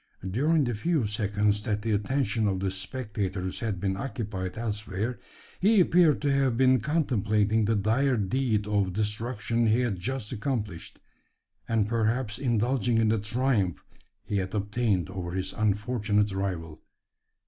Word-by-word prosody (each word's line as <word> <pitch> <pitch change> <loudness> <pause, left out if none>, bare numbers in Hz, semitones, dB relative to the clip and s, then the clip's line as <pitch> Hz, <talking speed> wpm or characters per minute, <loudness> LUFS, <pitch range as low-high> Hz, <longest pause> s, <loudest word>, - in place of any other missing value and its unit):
During 145 - +2
the 120 -2 -1
few 150 +4 0
seconds 105 0 0
that 105 -1 -2
the 115 - -1
attention 110 0 0
of 95 -2 0
the 95 0 -1
spectators 95 -2 -3
had 110 -5 -2
been 95 0 -1
occupied 100 -6 -4
elsewhere, 110 0 -3 0.4
he 210 +2 +4
appeared 170 -4 +4
to 145 - +2
have 135 -4 +2
been 130 0 +5
contemplating 110 -6 +1
the 110 +2 +2
dire 115 +6 +2
deed 110 +1 0
of 100 -3 0
destruction 115 +2 -1
he 110 +3 +3
had 110 -7 -1
just 120 +2 -3
accomplished, 110 -7 -4 0.7
and 110 -2 +2
perhaps 115 0 0
indulging 120 -1 +1
in 110 -1 +3
the 110 0 +2
triumph 105 -4 0 0.4
he 105 - -2
had 95 +1 -2
obtained 105 -2 0
over 90 -2 -5
his 95 0 -2
unfortunate 105 -1 +1
rival. 90 -5 -4
110 Hz, 145 wpm, -27 LUFS, 100-125 Hz, 0.7 s, been